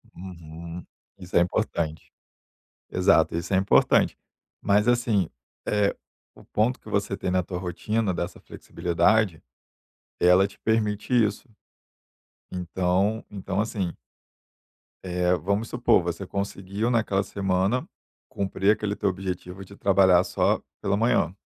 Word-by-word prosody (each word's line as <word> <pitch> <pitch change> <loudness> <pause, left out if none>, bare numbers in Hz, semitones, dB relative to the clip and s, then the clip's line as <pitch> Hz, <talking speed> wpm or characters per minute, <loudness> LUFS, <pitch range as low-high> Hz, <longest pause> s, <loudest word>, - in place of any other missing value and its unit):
Uhum. 85 -1 -9 0.3
Isso 90 -2 -9
é - - +6
importante. 80 -2 -2 0.8
Exato, - - +3
isso 85 +3 -4
é - - +5
importante, 95 +1 +3 0.4
mas 105 +3 +2
assim, 115 -7 +2 0.4
eh, 105 -1 +1 0.4
o - - -17
ponto 115 +4 0
que - - -14
você 100 0 -1
tem 95 - -3
na 90 0 +2
tua 90 +1 -6
rotina 95 +3 -1
dessa 85 +1 -4
flexibilidade, 90 +1 0 0.8
ela 90 +2 +5
te - - -19
permite 110 +1 0
isso, 110 0 +2 1.0
então 90 +4 0
então 100 0 -3
assim 100 -5 -2 1.1
eh, 90 -1 +1
vamos 100 +7 -1
supor 120 -6 +3
você 85 +3 -4
conseguiu 100 +3 -3
naquela 105 -4 +1
semana 95 +4 0 0.4
cumprir 100 +1 +1
aquele 105 -1 -3
teu 100 - +1
objetivo 90 0 -5
de 100 +1 -14
trabalhar 95 -2 +5
só - - +1 0.2
pela 100 +1 0
manhã, 105 -7 +2
95 Hz, 125 wpm, -25 LUFS, 90-105 Hz, 1.1 s, é